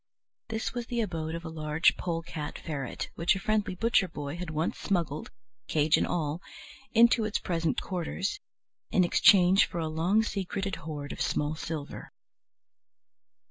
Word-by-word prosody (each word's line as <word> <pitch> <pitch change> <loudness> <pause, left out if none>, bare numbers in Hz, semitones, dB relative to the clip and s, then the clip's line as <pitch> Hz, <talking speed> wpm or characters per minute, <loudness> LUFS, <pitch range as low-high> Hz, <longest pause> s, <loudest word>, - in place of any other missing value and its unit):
This 220 0 -2
was 240 -2 -4
the 240 -1 -1
abode 165 -6 -3
of 170 +1 -7
a - - -4
large 155 0 +2
polecat 165 -3 -4
ferret, 140 -5 -5
which 170 +4 +2
a - - -3
friendly 210 0 0
butcher 225 -1 +3
boy 145 -3 -5
had 175 -1 -5
once 155 +2 -2
smuggled, 165 -6 -1 0.4
cage 155 0 +3
and - - +1
all, 160 0 -1 0.5
into 235 0 +5
its 215 -1 0
present 165 -2 -1
quarters, 185 - -3 0.5
in 185 - +4
exchange 185 +2 +6
for - - -6
a 165 -1 -1
long 170 +8 +2
secreted 195 -2 -3
hoard 145 -2 -6
of - - -6
small 145 +4 0
silver. 155 -2 -6
170 Hz, 150 wpm, -29 LUFS, 155-195 Hz, 0.5 s, exchange